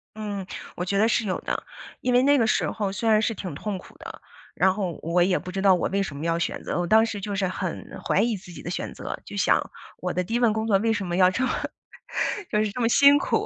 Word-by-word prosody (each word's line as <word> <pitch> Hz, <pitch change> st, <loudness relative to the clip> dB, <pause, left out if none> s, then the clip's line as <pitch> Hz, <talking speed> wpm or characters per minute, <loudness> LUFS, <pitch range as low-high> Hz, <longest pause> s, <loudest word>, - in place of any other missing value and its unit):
嗯， 205 Hz, -3 st, -4 dB, 0.3 s
我 180 Hz, -, -3 dB
觉 195 Hz, +2 st, -1 dB
得 220 Hz, +2 st, +4 dB
是 230 Hz, -1 st, +1 dB
有 185 Hz, -, -1 dB
的。 -, -, -3 dB, 0.4 s
因 250 Hz, -, +1 dB
为 245 Hz, -, +6 dB
那 285 Hz, +1 st, +5 dB
个 230 Hz, -, +3 dB
时 -, -, +1 dB
候 205 Hz, -3 st, -2 dB
虽 220 Hz, +3 st, -1 dB
然 215 Hz, 0 st, +5 dB
是 225 Hz, -, 0 dB
挺 185 Hz, -7 st, -6 dB
痛 205 Hz, +6 st, -3 dB
苦 185 Hz, -, -14 dB
的， -, -, -10 dB, 0.3 s
然 190 Hz, +1 st, +3 dB
后 190 Hz, -5 st, -3 dB
我 170 Hz, +2 st, +2 dB
也 185 Hz, 0 st, +2 dB
不 180 Hz, -, -8 dB
知 195 Hz, +1 st, -3 dB
道 195 Hz, -1 st, +6 dB
我 180 Hz, -, +1 dB
为 200 Hz, +1 st, +1 dB
什 155 Hz, -7 st, -6 dB
么 150 Hz, -, -5 dB
要 165 Hz, 0 st, +1 dB
选 170 Hz, -, -2 dB
择， -, -, -2 dB
我 175 Hz, -, 0 dB
当 220 Hz, +5 st, +5 dB
时 210 Hz, -3 st, -5 dB
就 205 Hz, +1 st, -4 dB
是 190 Hz, -1 st, +1 dB
很 185 Hz, -1 st, -4 dB, 0.2 s
怀 -, -, +2 dB
疑 230 Hz, -1 st, +1 dB
自 180 Hz, -1 st, -11 dB
己 170 Hz, -, -9 dB
的 175 Hz, -, -6 dB
选 180 Hz, -, -4 dB
择， -, -, -6 dB
就 -, -, -8 dB
想 -, -, +3 dB, 0.4 s
我 180 Hz, -, -3 dB
的 180 Hz, +1 st, -1 dB
第 225 Hz, -, -6 dB
一 240 Hz, -, +2 dB
份 235 Hz, -3 st, +4 dB
工 220 Hz, +1 st, -2 dB
作 200 Hz, -3 st, +4 dB
为 225 Hz, +2 st, +1 dB
什 205 Hz, -3 st, -1 dB
么 175 Hz, -, -2 dB
要 185 Hz, 0 st, +5 dB
这 260 Hz, +7 st, 0 dB
么 -, -, 0 dB, 1.0 s
就 210 Hz, -1 st, +2 dB
是 210 Hz, -, -2 dB
这 250 Hz, -, -4 dB
么 230 Hz, -, +3 dB
辛 280 Hz, +4 st, +7 dB
苦。 425 Hz, +8 st, 0 dB
200 Hz, 305 characters per minute, -25 LUFS, 180-225 Hz, 1.0 s, 辛